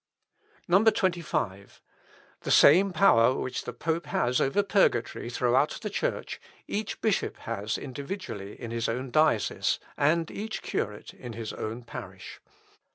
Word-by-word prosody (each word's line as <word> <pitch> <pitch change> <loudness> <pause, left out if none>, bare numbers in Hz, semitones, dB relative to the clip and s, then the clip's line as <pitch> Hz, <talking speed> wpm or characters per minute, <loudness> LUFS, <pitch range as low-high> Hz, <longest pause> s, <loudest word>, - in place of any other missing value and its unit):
25. 175 - +1 0.6
"The - - -6
same 190 +7 +6
power 130 -9 +5
which 130 - -4
the - - -4
pope 160 +6 -2
has 125 -2 +1
over 135 +10 +2
purgatory 195 - +1
throughout 125 +4 +1
the 210 - -3
Church, - - -3 0.3
each 210 +1 -3
bishop 215 -4 0
has 110 -1 -3
individually 140 - -6
in 115 - -6
his 115 -1 -1
own 125 +2 -3
diocese, 155 -8 +2 0.2
and 160 +3 +2
each 215 +2 -5
curate 105 0 -4
in 120 -2 -9
his 110 -1 -5
own 115 +3 -5
parish. 115 - -9
135 Hz, 130 wpm, -28 LUFS, 115-185 Hz, 0.6 s, same